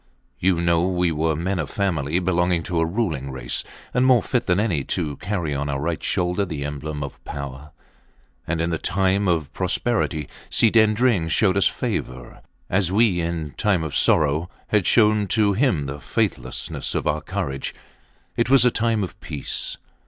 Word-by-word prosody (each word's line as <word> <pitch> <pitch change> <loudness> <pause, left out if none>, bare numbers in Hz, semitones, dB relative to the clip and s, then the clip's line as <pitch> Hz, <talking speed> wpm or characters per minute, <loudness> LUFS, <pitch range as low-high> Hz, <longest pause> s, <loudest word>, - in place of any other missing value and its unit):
You 90 -2 +2
know 85 0 +2
we 90 -2 +1
were 80 0 0
men 90 +4 -1
of 80 - -3
family, 85 -6 0
belonging 90 -2 +1
to 85 0 -1
a 80 - +3
ruling 80 - -2
race, - - -2 0.3
and 125 - +3
more 130 -4 +5
fit 125 - -1
than 90 +1 +3
any 90 -10 0
to 75 -2 -2
carry 90 -5 -2
on 70 +1 -2
our 70 -1 -1
right 80 +3 -2
shoulder 90 +2 0
the 80 -7 -4
emblem 75 +1 -4
of 70 - -8
power. 70 +1 -7 0.8
And 80 0 -1
in 85 +1 0
the 80 - -1
time 95 +1 +1
of 80 -4 0
prosperity 90 - 0 0.2
Si 110 - +3
Dendring 110 -5 +3
showed 95 +3 +3
us 100 - +4
favour, 60 -1 -4 0.3
as 95 -1 +1
we, 100 -3 +3
in 85 -3 -3
time 95 -6 +2
of 80 -3 -4
sorrow, 75 +3 +3 0.2
had 105 -4 +2
showed 105 -3 +4
to 105 -1 +3
him 100 - +1
the 70 +1 -5
faithfulness 65 -2 -2
of - - -1
our - - 0
courage. 70 0 -4 0.6
It 115 - +1
was 135 -2 +6
a 125 - +5
time 115 -2 +1
of 90 - -7
peace. 75 -2 -4
85 Hz, 175 wpm, -23 LUFS, 75-100 Hz, 0.8 s, was